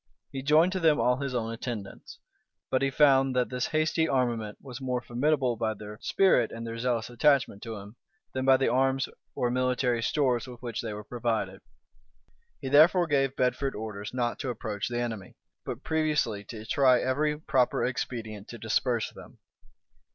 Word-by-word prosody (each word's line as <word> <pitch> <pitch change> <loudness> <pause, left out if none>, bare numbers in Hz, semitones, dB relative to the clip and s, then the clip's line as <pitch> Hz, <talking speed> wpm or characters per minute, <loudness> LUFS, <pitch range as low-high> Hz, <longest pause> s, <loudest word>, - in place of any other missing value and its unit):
He 135 - -4
joined 155 +6 +4
to 190 - -1
them 160 -3 +4
all 125 0 +3
his 135 -2 -3
own 115 -1 -2
attendants; 115 -4 -7 0.5
but 130 - +2
he 135 - +2
found 135 -2 +4
that 125 -1 +1
this 125 -1 -2
hasty 155 +1 +1
armament 120 -6 -1
was 130 -1 -9
more 125 -1 -1
formidable 125 +1 0
by 110 -1 -1
their 105 +1 -10
spirit 180 - +3
and 115 0 -6
their 115 0 -5
zealous 120 -2 0
attachment 125 -4 +2
to 115 -1 -6
him, 105 +3 -11 0.4
than 130 - -2
by 135 0 +6
the 135 - +1
arms 135 +2 +2 0.3
or 120 - 0
military 125 -1 +1
stores 125 -2 +1
with 125 -2 -10
which 120 -2 -4
they 115 - -4
were 105 0 -6
provided. 115 -1 -2 1.0
He - - -4
therefore 160 +5 +6
gave 135 -3 +1
Bedford 130 +2 0
orders 105 -1 -6
not 120 -2 -2
to 135 - -3
approach 110 -3 -3
the 120 0 -2
enemy; 115 -5 -4 0.3
but 125 - -6
previously 155 -10 0
to 110 0 -8
try 130 +1 +4
every 150 +4 0
proper 130 -5 +1
expedient 110 -4 -4
to 120 - -8
disperse 115 +1 0
them. - - -14
125 Hz, 175 wpm, -28 LUFS, 115-135 Hz, 1.0 s, by